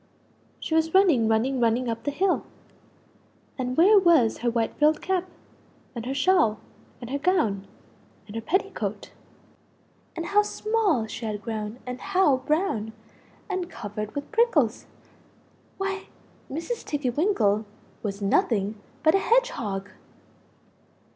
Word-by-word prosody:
She - - -4
was 320 +2 +2
running 330 - +5
running 235 +4 +1
running 240 +1 +2
up 230 -1 -4
the - - +1
hill 370 +6 +1 1.1
and 255 -1 -3
where 400 +5 +7
was 330 - +4
her 240 - +1
white 230 -1 -1
frilled 305 +1 +4
cap? 370 -1 -1 0.6
and 235 -1 -6
her 265 - -1
shawl? 275 - +3 0.4
and 240 0 -8
her 280 - -1
gown 225 - +1 0.6
and 205 +1 -11
her 225 - -2
petticoat? 380 - -2 1.0
And 335 -1 -4
how 410 +3 +4
small 415 - 0
she 225 +1 -6
had 210 -1 -4
grown 215 0 -4
and 250 0 -6
how 370 -8 +3
brown 260 - -1 0.5
and 370 -4 -3
covered 210 -1 -6
with 285 0 -5
PRICKLES! 360 - +2 0.9
Why! 390 0 -3 0.4
Mrs. 335 - -4
Tiggy 285 -4 -2
winkle 225 - +1 0.4
was 200 -1 -4
nothing 205 +1 +1 0.2
but 315 0 +5
a 390 - +4
HEDGEHOG. 220 - 0
265 Hz, 130 wpm, -26 LUFS, 220-370 Hz, 1.1 s, where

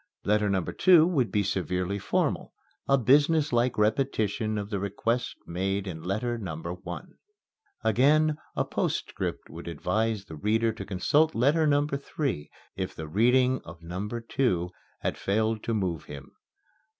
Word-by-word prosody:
Letter 105 0 +2
number 95 -3 -1
two 175 -4 +6
would 145 -10 +1
be 105 -2 +2
severely 90 0 -1
formal - - -1 0.3
a 135 - +5
business 145 +4 +3
like 120 +1 +2
repetition 110 -1 +1
of 100 +1 -4
the 100 - -1
request 115 +5 -1
made 95 +3 -2
in 85 -4 -6
letter 110 +7 -2
number 85 -3 -5
one. 90 - -9 0.6
Again 150 +7 +4 0.2
a - - +1
postscript - - -2
would - - -9
advise 100 +6 -1
the 80 - -9
reader 110 +6 +1
to 110 - -7
consult 145 - +2
letter 150 +7 +3
number 145 -1 +2
three, 135 - -3 0.3
if 95 0 -4
the 80 - -6
reading 125 +8 +3
of 85 0 -12
number 100 +7 -4
two 95 -8 0 0.3
had - - -2
failed 110 +2 0
to 115 - 0
move 90 -7 -2
him. 70 -1 -10
110 Hz, 150 wpm, -28 LUFS, 95-130 Hz, 0.6 s, two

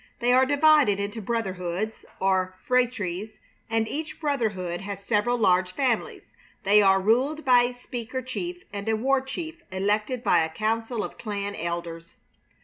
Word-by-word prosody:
They 245 +1 +3
are 260 +1 +5
divided 285 -7 +4
into 205 +3 -3
brotherhoods, 195 -2 -3
or 185 -1 +1
phratries, 220 -6 0 0.3
and 225 -1 +1
each 305 +6 -5
brotherhood 210 - -1
has 200 0 -6
several 235 +3 +1
large 185 -4 +2
families. 255 -2 -1 0.3
They 205 +1 +6
are 195 -1 +5
ruled 260 +10 +1
by 250 -2 +6
a 245 - -3
speaker 245 +1 -6
chief 350 +8 -5
and 200 +2 -4
a 220 - +3
war 265 +4 +2
chief 320 +5 -6
elected 210 +6 -1
by - - +4
a 160 - -2
council 225 +5 -1
of - - -8
clan 205 -2 -3
elders. 170 -1 -5
220 Hz, 150 wpm, -26 LUFS, 195-255 Hz, 0.3 s, They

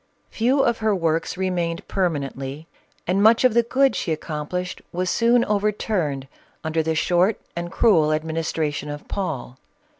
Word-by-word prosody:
Few 250 +5 +2
of 235 - +1
her 215 -2 +2
works 165 0 -1
re 190 0 0
mained 170 -2 -2
permanently, 145 -5 -2 0.4
and 185 +3 +1
much 225 +3 +5
of 255 -3 +5
the 235 - +5
good 265 +3 +2
she 160 - -1
accom 150 -1 -6
plished 180 0 -4
was 180 +1 -1
soon 235 +1 +3
overturned 200 -9 -1 0.4
under 160 +1 0
the 160 0 -1
short 180 +6 +2 0.2
and 170 0 -4
cruel 170 -8 +4
administration 155 -1 -2
of 145 0 -7
Paul. 150 -10 -4
175 Hz, 155 wpm, -23 LUFS, 155-210 Hz, 0.4 s, much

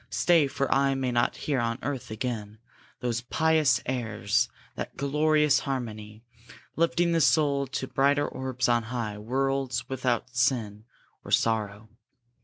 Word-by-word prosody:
Stay, 165 -5 +3
for 140 0 -1
I 135 0 +2
may 130 -2 -1
not 120 +1 +1
hear 140 -3 +1
on 115 0 -1
earth 135 -2 -4
again 110 -2 -4 0.4
Those 120 -1 -1
pious 155 +3 +2
airs 115 -1 0 0.2
that - - -7
glorious 150 +1 +3
harmony; 110 -5 -5 0.5
Lifting 170 +1 +2
the 165 -1 +2
soul 140 -3 +3
to 130 - -3
brighter 140 +2 +2
orbs 130 -1 -2
on 120 -1 +3
high, 110 -4 -3
Worlds 130 +2 -1
without 125 -1 -2
sin 110 -4 0 0.4
or - - -10
sorrow! 110 -1 0
130 Hz, 135 wpm, -27 LUFS, 115-140 Hz, 0.5 s, Stay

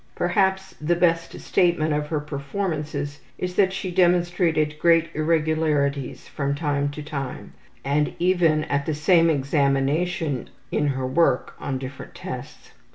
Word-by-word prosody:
Perhaps 190 +1 +1
the 170 +3 +2
best 165 -1 +1
statement 170 -4 +2
of 150 0 -1
her 155 -1 -1
performances 145 -1 -4 0.2
is 180 0 -3
that 190 0 +3
she 190 -1 -4
demonstrated 175 -4 +2
great 165 0 +4
irregularities 155 -3 0
from 140 -1 -2
time 145 -2 0
to 150 +1 -7
time, 140 -3 -6 0.3
and 145 +2 +1
even 170 -4 +3
at 140 -2 -1
the 155 - 0
same 165 +2 +4
examination 140 - 0 0.2
in 150 - +1
her 130 -2 -1
work 160 +6 +2
on 135 - -3
different 130 +1 -8
tests. - - -8
155 Hz, 135 wpm, -24 LUFS, 145-175 Hz, 0.3 s, great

